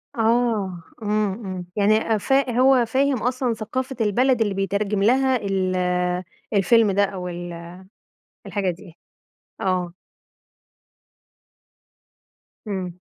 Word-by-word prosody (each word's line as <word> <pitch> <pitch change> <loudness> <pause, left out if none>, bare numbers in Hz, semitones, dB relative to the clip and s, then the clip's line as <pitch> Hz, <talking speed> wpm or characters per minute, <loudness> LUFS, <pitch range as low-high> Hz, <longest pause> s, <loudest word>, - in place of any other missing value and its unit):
آه، 225 -6 +1 0.2
إمم، 210 -1 +1
إمم. 185 -2 -5
يعني 215 +1 +2
فا 270 +3 +2
هو 260 -2 +5
فاهم 270 +4 +1
أصلًا 250 0 0
ثقافة 255 +5 -4
البلد 245 +4 +2
اللي 205 -3 +1
بيترجم 200 +1 -1
لها 260 +4 +3
ال 195 -4 -1 0.8
الفيلم 210 +2 +4
ده 200 +1 +3
أو 190 -2 -3
ال 175 -1 -7 0.7
الحاجة 200 -3 -1
دي؟ 175 0 -13 0.7
آه. 185 -4 -1 2.7
إمم. 185 -3 -4
210 Hz, 100 wpm, -23 LUFS, 190-240 Hz, 2.7 s, هو